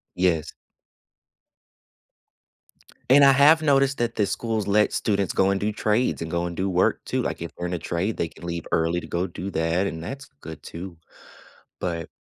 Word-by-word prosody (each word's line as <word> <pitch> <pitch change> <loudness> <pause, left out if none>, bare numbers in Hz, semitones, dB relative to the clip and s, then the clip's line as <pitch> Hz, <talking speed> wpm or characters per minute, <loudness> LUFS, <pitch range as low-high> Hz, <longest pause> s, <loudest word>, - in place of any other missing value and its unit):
Yes. 90 -4 +1 2.6
And 140 +1 +8
I 135 - +7
have 150 +4 +6
noticed 140 -2 +3
that 120 -1 -1
the 105 - +1
schools 110 -3 -2
let 105 +1 +3
students 100 -3 0
go 95 0 +2
and 100 - 0
do 105 +1 -1
trades 110 -2 0
and 80 - -5
go 85 +1 -1
and 85 - -6
do 95 +1 -1
work 90 0 +1
too. - - -1
Like, - - -4
if 85 - -5
they're 90 - -4
in 90 - -3
a - - -2
trade, 90 +6 -2
they 85 - -1
can 85 - -12
leave 85 -1 -4
early 85 +2 +1
to - - -10
go 90 +2 -1
do 90 +2 -6
that, 85 +3 0
and 80 -3 -5
that's 135 +9 -7
good 80 -1 -9
too. 85 0 -8 0.8
But 85 -2 -3
95 Hz, 190 wpm, -24 LUFS, 85-110 Hz, 2.6 s, And